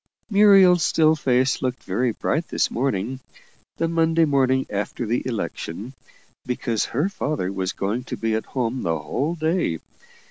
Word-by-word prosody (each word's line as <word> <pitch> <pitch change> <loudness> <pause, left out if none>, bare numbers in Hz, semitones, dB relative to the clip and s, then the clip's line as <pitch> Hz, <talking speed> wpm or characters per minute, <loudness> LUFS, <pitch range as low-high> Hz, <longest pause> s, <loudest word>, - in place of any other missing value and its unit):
Muriel's 195 -4 +6
still 155 0 +4
face 130 -3 +1
looked 130 -1 -2
very 120 +6 0
bright 155 +8 -2
this - - 0
morning 125 0 -1 0.6
the 165 - 0
Monday 165 0 +2
morning 130 -2 +2
after 105 +4 -3
the 115 +3 0
election 115 -1 -5 0.5
because 120 -3 -1
her 145 +9 0
father 150 - -2
was 95 -1 -2
going 105 +6 -2
to - - -5
be 115 -1 -1
at 110 - -2
home 125 +1 -1
the 80 -3 0
whole 145 - -2
day. 160 - 0
130 Hz, 150 wpm, -23 LUFS, 110-160 Hz, 0.6 s, Muriel's